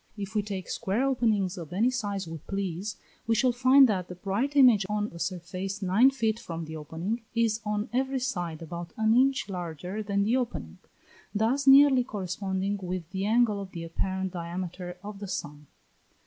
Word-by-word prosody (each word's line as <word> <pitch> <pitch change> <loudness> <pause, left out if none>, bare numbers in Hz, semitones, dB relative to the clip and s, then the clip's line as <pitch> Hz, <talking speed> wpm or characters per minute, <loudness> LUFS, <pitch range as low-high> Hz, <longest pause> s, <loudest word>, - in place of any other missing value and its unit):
If 200 +1 -5
we 215 - +2
take 200 -3 -5
square 220 +3 -1
openings 215 -8 +1
of 165 -2 -8
any 220 +8 +2
size 205 -6 -3
we 165 -1 -6
please, 195 +3 -4 0.3
we 225 - +3
shall 250 +3 +3
find 260 +2 +6
that 185 -5 -1
the 180 - -8
bright 205 +10 -2
image 245 -7 +7
on 210 0 -1
a 170 - -9
surface 185 +3 -4
nine 200 +8 +5
feet 230 -4 -1
from 165 -8 -6
the 160 +1 -7
opening, 165 +9 -4
is 230 -1 +1
on 210 +2 -1
every 265 +2 0
side 175 -11 -3
about 170 +3 -7
an 220 0 +3
inch 265 -2 +3
larger 180 +1 -5
than 200 -1 0
the 230 +5 +2
opening; 85 - -4 0.6
thus 250 +7 +1
nearly 270 -1 +8
corresponding 195 -2 -3
with 180 -2 -5
the 190 +1 -2
angle 220 -2 +3
of 190 -1 -9
the 170 -2 -5
apparent 190 +3 -3
diameter 175 +1 -5
of 205 -1 -7
the 200 - -6
sun. 145 -4 -5
200 Hz, 180 wpm, -28 LUFS, 180-230 Hz, 0.6 s, nearly